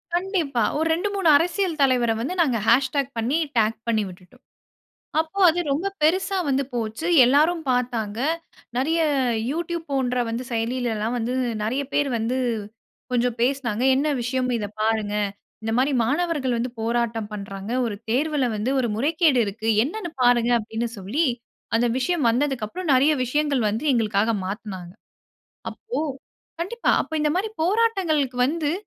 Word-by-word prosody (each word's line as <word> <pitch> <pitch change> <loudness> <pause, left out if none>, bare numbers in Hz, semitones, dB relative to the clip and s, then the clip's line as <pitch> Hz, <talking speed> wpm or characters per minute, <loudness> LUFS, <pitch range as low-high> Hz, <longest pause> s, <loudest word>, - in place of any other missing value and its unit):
கண்டிப்பா. 345 - 0
ஒரு 320 +1 +1
2, 360 +5 -1
3 385 -4 0
அரசியல் 345 -1 -1
தலைவர 245 -3 +3
வந்து, 330 +9 -2
நாங்க 255 -8 +2
ஹேஷ்டாக் 270 +2 +2
பண்ணி 245 +8 +1 0.2
டாக் 220 0 +2
பண்ணி 220 -2 +2
விட்டுட்டோம். 185 +8 -15 0.8
அப்போ 320 +5 -5
அது 350 +2 -1
ரொம்ப 330 +8 -1 0.2
பெரிசா 375 +5 +2
வந்து 275 0 +1
போச்சு. 230 +7 -3 0.2
எல்லாரும் 310 +6 +3
பார்த்தாங்க 235 -4 -1 0.6
நெறைய 315 +6 +1 0.5
youtube 340 +1 -3
போன்ற 250 -2 0
வந்து 230 +2 -3
செயலியிலல்லாம் 230 -1 -1
வந்து 240 +1 -2 0.3
நெறைய 255 +6 -1
பேர் 290 -1 +1
வந்து 235 +4 -1 0.8
கொஞ்சம் 245 -1 +1
பேசுனாங்க. 245 -3 0
என்ன 285 +3 +1
விஷயம்? 255 +1 -1
இதை 205 -2 -3
பாருங்க. 220 -2 0 0.5
இந்த 225 0 -2
மாரி 275 +2 +2
மாணவர்கள் 290 -2 0
வந்து 240 +2 -2
போராட்டம் 230 -2 -1
பண்றாங்க. 195 0 -6 0.2
ஒரு 205 -3 -4
தேர்வுல 290 +2 +1
வந்து 220 +5 -1
ஒரு 240 - 0
முறைகேடு 300 0 +3
இருக்கு. 220 +3 -4 0.2
என்னென்னு 350 +3 -4
பாருங்க? 245 -1 +4
அப்டின்னு 225 +2 -3
சொல்லி 230 - 0 0.5
அந்த 240 +1 +2
விஷயம் 330 +1 0
வந்ததுக்கு 260 -2 0
அப்புறம் 350 +6 -4
நெறைய 280 +4 +4
விஷயங்கள் 285 -1 0
வந்து 220 +8 -2
எங்களுக்காக 220 -1 +1
மாத்துனாங்க. 190 -3 -6 0.8
அப்போ 460 -5 -5 0.6
கண்டிப்பா. 470 +7 0
அப்ப - - -11
இந்த 300 -1 +2
மாரி 415 +4 0
போராட்டங்களுக்கு 355 - +1
வந்து 305 -1 -1
255 Hz, 140 wpm, -23 LUFS, 230-315 Hz, 0.8 s, பாருங்க